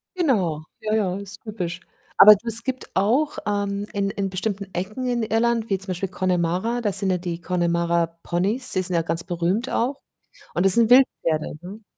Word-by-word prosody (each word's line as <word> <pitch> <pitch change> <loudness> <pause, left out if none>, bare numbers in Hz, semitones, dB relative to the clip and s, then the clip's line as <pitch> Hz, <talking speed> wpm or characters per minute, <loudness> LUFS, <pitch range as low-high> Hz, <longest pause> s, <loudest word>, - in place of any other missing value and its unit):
Genau, 195 - 0 0.2
ja, 215 0 -2
ja, 195 -4 +1
ist 200 0 -8
typisch. 185 -5 -5 0.4
Aber 210 +1 +10
du 210 +4 -12
es 230 0 +4
gibt 260 0 -4
auch, 245 +10 +1
ähm, 205 0 -1
in 200 -1 -1
in 195 -1 -3
bestimmten 195 0 -4
Ecken 215 +8 -3
in 240 -2 0
Irland, 225 +1 0
wie 195 - +1
zum 195 - -13
Beispiel 185 +1 -3
Connemara, 185 +5 -1
da 210 - 0
sind 195 0 -1
ja 180 - +2
die 175 -1 -5
Connemara-Ponys, 170 - -1
die 185 - +1
sind 180 -1 -2
ja 165 - +3
ganz 165 +1 -2
berühmt 180 +8 -1
auch 265 +4 -1 0.5
und 175 - +1
das 195 - +5
sind 230 -2 +4
Wildpferde, 165 - +3
ne? 200 +5 -10
195 Hz, 185 wpm, -23 LUFS, 175-225 Hz, 0.5 s, Aber